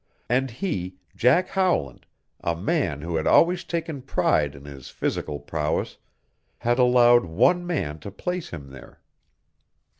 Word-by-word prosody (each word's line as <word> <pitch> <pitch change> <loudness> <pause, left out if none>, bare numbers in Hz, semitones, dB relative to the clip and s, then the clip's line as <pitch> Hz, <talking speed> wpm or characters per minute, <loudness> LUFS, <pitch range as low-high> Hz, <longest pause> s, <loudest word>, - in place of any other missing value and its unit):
And 130 +3 +1
he, 95 - -4 0.2
Jack 140 +10 +3
Howland, 180 - 0 0.4
a 85 - 0
man 90 - -1
who 85 +1 -2
had 80 - -1
always 175 +1 +4
taken 165 -4 -4
pride 75 - +1
in 70 +1 -13
his 70 -2 -10
physical 75 -1 -3
prowess, 75 +1 -3 0.6
had 120 +2 0
allowed 120 -2 +5
one 175 - +2
man 80 - -2
to 75 - -8
place 180 - -4
him 70 -5 -9
there. 70 +1 -13
115 Hz, 140 wpm, -24 LUFS, -, 0.6 s, allowed